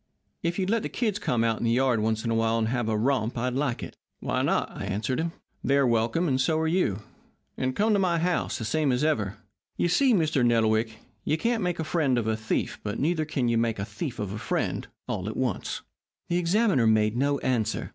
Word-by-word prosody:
If 170 Hz, +1 st, -1 dB
you'd 190 Hz, 0 st, 0 dB
let 230 Hz, -1 st, +2 dB
the -, -, -4 dB
kids 215 Hz, -5 st, -1 dB
come 115 Hz, -2 st, 0 dB
out 115 Hz, -1 st, +1 dB
in -, -, -4 dB
the 115 Hz, -, +2 dB
yard 125 Hz, -1 st, +2 dB
once 110 Hz, +1 st, 0 dB
in 115 Hz, -, 0 dB
a -, -, +2 dB
while 115 Hz, 0 st, +2 dB
and 110 Hz, -1 st, 0 dB
have 120 Hz, -2 st, -1 dB
a 110 Hz, -, +1 dB
romp 120 Hz, 0 st, 0 dB
I'd 125 Hz, +2 st, -1 dB
like 135 Hz, -2 st, -1 dB
it.' -, -, -8 dB, 0.2 s
"'Why -, -, -1 dB
not?' -, -, +1 dB
I -, -, -5 dB
answered 105 Hz, +6 st, -1 dB
him. 165 Hz, +1 st, -1 dB, 0.3 s
'They're 140 Hz, 0 st, +3 dB
welcome, 115 Hz, +8 st, +1 dB
and 130 Hz, -3 st, +1 dB
so 155 Hz, +4 st, +2 dB
are 160 Hz, -, 0 dB
you. 135 Hz, -, 0 dB, 0.5 s
And 130 Hz, 0 st, -2 dB
come 215 Hz, +1 st, +2 dB
to 205 Hz, -, +3 dB
my 180 Hz, -3 st, +2 dB
house, 175 Hz, +1 st, 0 dB
the 115 Hz, -, -4 dB
same 150 Hz, +4 st, +1 dB
as 125 Hz, +3 st, +1 dB
ever.' 110 Hz, -11 st, 0 dB, 0.4 s
You 175 Hz, -, +1 dB
see, 255 Hz, +6 st, +4 dB
Mr. 155 Hz, -7 st, +2 dB
Nettlewick, 110 Hz, -1 st, +2 dB, 0.3 s
you 155 Hz, -, +1 dB
can't 230 Hz, +6 st, 0 dB
make 180 Hz, -2 st, -1 dB
a 160 Hz, -, -2 dB
friend 155 Hz, -5 st, +1 dB
of 115 Hz, -, 0 dB
a 110 Hz, 0 st, +1 dB
thief, 110 Hz, 0 st, -2 dB
but 105 Hz, +1 st, -4 dB
neither 155 Hz, +1 st, +1 dB
can 140 Hz, -5 st, -1 dB
you 115 Hz, -1 st, +2 dB
make 115 Hz, -1 st, 0 dB
a 100 Hz, -, -3 dB
thief 120 Hz, +5 st, -5 dB
of 105 Hz, -3 st, -3 dB
a 105 Hz, -, -5 dB
friend, -, -, -2 dB, 0.2 s
all 95 Hz, +3 st, -3 dB
at 110 Hz, -, -6 dB
once." 125 Hz, -7 st, -2 dB, 0.5 s
The 175 Hz, -, +1 dB
examiner 180 Hz, -, +3 dB
made 110 Hz, 0 st, +3 dB
no 140 Hz, +3 st, +1 dB
answer. 115 Hz, -4 st, -1 dB
125 Hz, 235 wpm, -27 LUFS, 110-160 Hz, 0.5 s, see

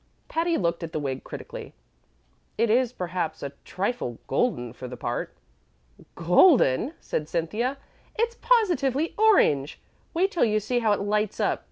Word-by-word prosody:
Patty 335 Hz, +1 st, +1 dB
looked 170 Hz, -1 st, -1 dB
at 165 Hz, -1 st, -6 dB
the -, -, -1 dB
wig 135 Hz, -2 st, -3 dB
critically. -, -, -8 dB, 0.8 s
"It 230 Hz, 0 st, +2 dB
is, 245 Hz, +1 st, +3 dB
perhaps, 180 Hz, -6 st, -3 dB
a 140 Hz, -, -4 dB
trifle 190 Hz, -, -3 dB
golden 125 Hz, -, 0 dB
for 125 Hz, +1 st, -8 dB
the 125 Hz, 0 st, -8 dB
part." 120 Hz, -, -3 dB, 0.8 s
"Golden!" 180 Hz, -, +4 dB
said 150 Hz, 0 st, -3 dB
Cynthia. 220 Hz, -, -1 dB, 0.4 s
"It's 465 Hz, +1 st, 0 dB
positively 335 Hz, -, +2 dB
orange. 370 Hz, -, +3 dB, 0.4 s
Wait 380 Hz, +4 st, +2 dB
till 340 Hz, -, +2 dB
you 215 Hz, -1 st, +2 dB
see 245 Hz, +4 st, -1 dB
how 225 Hz, -3 st, +2 dB
it 205 Hz, -, -1 dB
lights 210 Hz, +1 st, -1 dB
up. -, -, +1 dB
215 Hz, 150 wpm, -26 LUFS, -, 0.8 s, Golden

